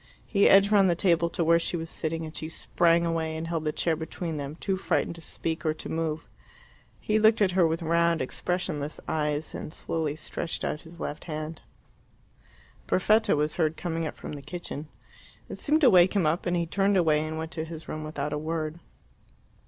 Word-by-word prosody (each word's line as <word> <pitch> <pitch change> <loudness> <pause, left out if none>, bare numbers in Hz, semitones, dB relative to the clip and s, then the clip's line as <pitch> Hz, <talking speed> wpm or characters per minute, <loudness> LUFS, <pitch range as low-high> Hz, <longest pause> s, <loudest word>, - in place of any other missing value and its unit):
He 200 -1 +4
edged 195 +1 +6
round 200 -3 +5
the 170 - +3
table 170 -2 +2
to 170 - -1
where 170 +1 +5
she 175 - -2
was 165 0 -6
sitting, 165 0 -3
and 155 - -9
she 155 - -5
sprang 170 +1 +2
away 160 -1 -1
and 160 +1 -4
held 165 -2 -2
the 155 - +1
chair 165 +1 0
between 160 0 -5
them, 145 +1 -5
too 190 +3 -1
frightened 175 -2 0
to 165 - -12
speak 165 0 -4
or 155 -1 +1
to - - -8
move. 160 -1 -2 0.7
He 215 0 +1
looked 220 +1 +5
at 200 -3 +3
her 180 -2 +4
with 165 +1 -2
round, 170 0 +2
expressionless 150 +1 -2
eyes, 150 -1 -1
and - - -6
slowly 160 -3 -2
stretched 160 +1 -4
out 150 - -2
his 170 +1 -14
left 150 - -5
hand. 155 -1 -5 1.3
Perfetta 215 +4 +3
was 150 +1 -1
heard 160 -2 +1
coming 165 -2 -2
up - - -7
from - - -7
the 145 -2 -6
kitchen. 150 0 -6 0.6
It - - -8
seemed 310 +2 +2
to 270 - +7
wake 180 +2 +6
him 190 -5 +3
up, 160 +4 0
and 175 0 +1
he 170 - 0
turned 195 +3 +2
away 160 -4 +4
and 155 0 -4
went 160 +1 -4
to 160 - -3
his 160 0 -8
room 155 - -5
without 150 -1 -3
a 150 - -1
word. 160 +1 -3
165 Hz, 205 wpm, -27 LUFS, 155-175 Hz, 1.3 s, to